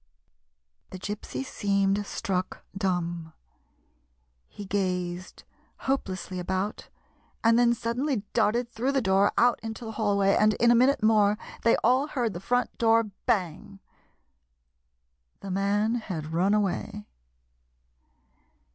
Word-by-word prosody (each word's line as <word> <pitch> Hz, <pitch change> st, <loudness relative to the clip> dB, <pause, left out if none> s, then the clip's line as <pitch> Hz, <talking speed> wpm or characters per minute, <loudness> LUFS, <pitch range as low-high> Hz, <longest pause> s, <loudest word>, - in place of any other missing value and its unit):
The -, -, -8 dB
Gypsy 210 Hz, +7 st, -5 dB
seemed 200 Hz, -3 st, 0 dB
struck 185 Hz, -1 st, -3 dB
dumb. 175 Hz, -4 st, -2 dB, 1.1 s
He 205 Hz, -, -9 dB
gazed 185 Hz, -2 st, -3 dB, 0.4 s
hopelessly 190 Hz, -8 st, -2 dB
about, 190 Hz, +3 st, -3 dB, 0.5 s
and 230 Hz, +1 st, +5 dB
then 240 Hz, -1 st, +4 dB
suddenly 235 Hz, +1 st, -2 dB
darted 235 Hz, +1 st, +2 dB
through 245 Hz, +4 st, -2 dB
the 270 Hz, -, +2 dB
door, 195 Hz, 0 st, +3 dB
out 245 Hz, 0 st, +4 dB
into 225 Hz, +1 st, -6 dB
the 220 Hz, -, -5 dB
hallway, 200 Hz, -3 st, +2 dB
and 215 Hz, 0 st, +3 dB
in 235 Hz, +1 st, +4 dB
a -, -, +5 dB
minute 255 Hz, 0 st, +3 dB
more 210 Hz, -1 st, +4 dB, 0.2 s
they 230 Hz, -, +4 dB
all 255 Hz, +5 st, +3 dB
heard 240 Hz, -8 st, -2 dB
the 175 Hz, -, -5 dB
front 245 Hz, +5 st, -1 dB
door 225 Hz, -2 st, +3 dB, 0.2 s
bang. 185 Hz, 0 st, -1 dB, 1.6 s
The 195 Hz, -, -6 dB
man 200 Hz, +3 st, +1 dB
had 170 Hz, -10 st, -4 dB
run 190 Hz, +5 st, +2 dB
away. 195 Hz, -, -2 dB
205 Hz, 120 wpm, -27 LUFS, 190-235 Hz, 1.6 s, and